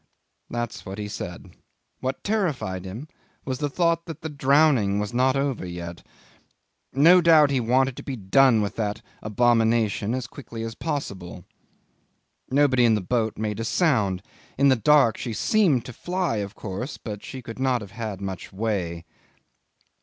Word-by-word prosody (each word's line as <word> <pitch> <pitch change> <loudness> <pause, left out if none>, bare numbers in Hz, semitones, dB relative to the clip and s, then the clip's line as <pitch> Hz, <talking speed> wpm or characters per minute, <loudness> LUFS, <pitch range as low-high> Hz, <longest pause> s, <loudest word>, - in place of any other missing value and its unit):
That's 120 -1 -4
what 95 +1 -7
he 105 -1 -4
said. 90 -2 -7 0.5
What 130 +1 -3
terrified 150 - -1
him 110 +11 -7 0.4
was 130 -1 -3
the 145 - -1
thought 170 +2 +1
that 165 -3 -7
the 160 - -4
drowning 140 -7 +3
was 105 +3 -2
not 130 +2 +3
over 135 -5 -1
yet. 85 -1 -7 0.9
No 170 +7 +6
doubt 160 -4 +6
he 135 - +2
wanted 130 +2 +2
to - - -6
be 135 - -4
done 115 +2 +4
with 100 - -4
that 105 -2 -2 0.2
abomination 115 0 +2
as 130 -2 -3
quickly 115 -2 -8
as 115 0 -4
possible. 100 - -5 1.0
Nobody 135 -2 +3
in 115 -2 +5
the 105 - -1
boat 110 +3 -1
made 105 0 -3
a - - -1
sound. 110 - +1 0.3
In 140 +1 +5
the 130 - +5
dark 120 -1 +4
she 120 - -4
seemed 160 - +2
to 125 - -8
fly, 175 -2 -2
but 100 - -1
of 100 - -12
course 110 +8 -5 0.2
she 130 +4 -9
could 115 +1 -8
not 130 -2 +1
have 100 -2 -9
had 110 -4 -5
much 95 -2 -6
way. 95 -5 -2
120 Hz, 165 wpm, -25 LUFS, 105-140 Hz, 1.0 s, No